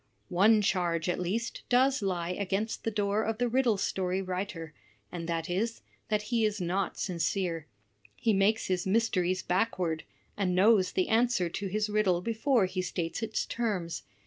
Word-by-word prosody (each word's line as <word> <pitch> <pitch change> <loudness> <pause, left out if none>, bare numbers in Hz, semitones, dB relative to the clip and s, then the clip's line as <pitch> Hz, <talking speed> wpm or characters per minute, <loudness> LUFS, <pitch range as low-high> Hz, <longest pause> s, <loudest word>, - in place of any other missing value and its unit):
".;. - - -43
One 210 +4 +4
charge, 175 -4 0
at 175 - 0
least, 210 +6 -2
does 260 +1 +3
lie 180 -3 -1
against 200 +3 -2
the - - 0
door 205 -1 0
of 225 0 -2
the 245 +1 +1
riddle 240 -3 +2
story 190 -1 -1
writer; 185 -4 -4 0.4
and 170 -1 -5
that 165 -1 -1
is, 220 +6 -2 0.3
that 210 -1 +1
he 230 -1 +3
is 210 -1 0
not 185 +2 -1
sincere; 170 -2 -1 0.5
he 225 - +1
makes 205 +3 +2
his 185 0 -1
mysteries 190 -4 +1
backward, 180 -5 0 0.3
and 185 -3 0
knows 195 0 +4
the 185 - +1
answer 225 -5 +2
to 195 +4 -4
his 210 +3 0
riddle 210 -4 +2
before 230 +2 +2
he 185 0 -2
states 170 +1 -3
its 220 -1 -1
terms. 190 -9 -2
195 Hz, 170 wpm, -30 LUFS, 180-220 Hz, 0.5 s, One